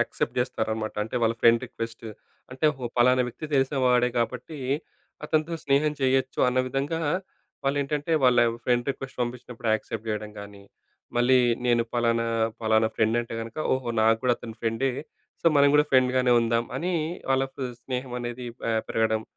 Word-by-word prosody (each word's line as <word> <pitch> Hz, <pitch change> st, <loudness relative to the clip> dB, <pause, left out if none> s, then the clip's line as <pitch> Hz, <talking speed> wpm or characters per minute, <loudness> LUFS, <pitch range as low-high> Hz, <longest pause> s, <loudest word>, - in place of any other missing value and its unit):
Accept -, -, -2 dB
చేస్తారనమాట. 110 Hz, -3 st, -2 dB
అంటే 110 Hz, +3 st, -4 dB
వాళ్ళ 115 Hz, 0 st, +2 dB
ఫ్రెండ్ 115 Hz, 0 st, +6 dB
రిక్వెస్ట్‌ని. 115 Hz, -1 st, -7 dB, 0.4 s
అంటే, 130 Hz, +4 st, -5 dB
"ఓహో! 125 Hz, -3 st, -6 dB
పలానా 125 Hz, +1 st, +5 dB
వ్యక్తి 125 Hz, +6 st, -7 dB
తెలిసినవాడే 130 Hz, -3 st, +3 dB
కాబట్టి, 125 Hz, +6 st, -3 dB, 0.7 s
అతనితో 155 Hz, +2 st, 0 dB
స్నేహం 145 Hz, +2 st, +2 dB
చేయొచ్చు" 130 Hz, 0 st, +1 dB
అన్న 125 Hz, +1 st, 0 dB
విధంగా 140 Hz, +5 st, -2 dB, 0.6 s
వాళ్లు 140 Hz, +1 st, +1 dB
ఏంటంటే, 150 Hz, +3 st, -2 dB
వాళ్ళ 125 Hz, -1 st, +5 dB, 0.3 s
ఫ్రెండ్ 120 Hz, 0 st, +1 dB
రిక్వెస్ట్‌ని 135 Hz, -1 st, -7 dB
పంపించినప్పుడు 120 Hz, -1 st, -5 dB
యాక్సెప్ట్ 110 Hz, 0 st, -5 dB
చేయడం 105 Hz, 0 st, -3 dB
గాని, 100 Hz, -1 st, -11 dB, 0.5 s
మళ్ళీ 125 Hz, +2 st, +5 dB, 0.3 s
నేను 120 Hz, -1 st, +3 dB
ఫలానా 115 Hz, -1 st, +1 dB, 0.3 s
ఫలానా 110 Hz, 0 st, +3 dB
ఫ్రెండ్ 110 Hz, +1 st, +2 dB
అంటే 115 Hz, -1 st, -6 dB
గనక, 115 Hz, 0 st, -8 dB, 0.2 s
"ఓహో! 130 Hz, -2 st, -4 dB
నాకు 110 Hz, +1 st, +4 dB
గూడా 125 Hz, -1 st, +4 dB
అతను 110 Hz, -1 st, -9 dB
ఫ్రెండే. 115 Hz, +4 st, 0 dB, 0.5 s
సో, -, -, -1 dB
మనం 140 Hz, 0 st, +6 dB
కూడా 150 Hz, -, +5 dB
ఫ్రెండ్‍గానే 130 Hz, -1 st, +3 dB
ఉందాం" 115 Hz, 0 st, +1 dB
అని 175 Hz, +7 st, -2 dB, 0.4 s
వాళ్ళకు 135 Hz, +1 st, 0 dB, 0.2 s
స్నేహం 125 Hz, -1 st, -4 dB
అనేది, 120 Hz, +1 st, -5 dB
పె 115 Hz, -, -2 dB, 0.2 s
పెరగడం 110 Hz, -1 st, +1 dB
125 Hz, 150 wpm, -26 LUFS, 115-135 Hz, 0.7 s, ఫ్రెండ్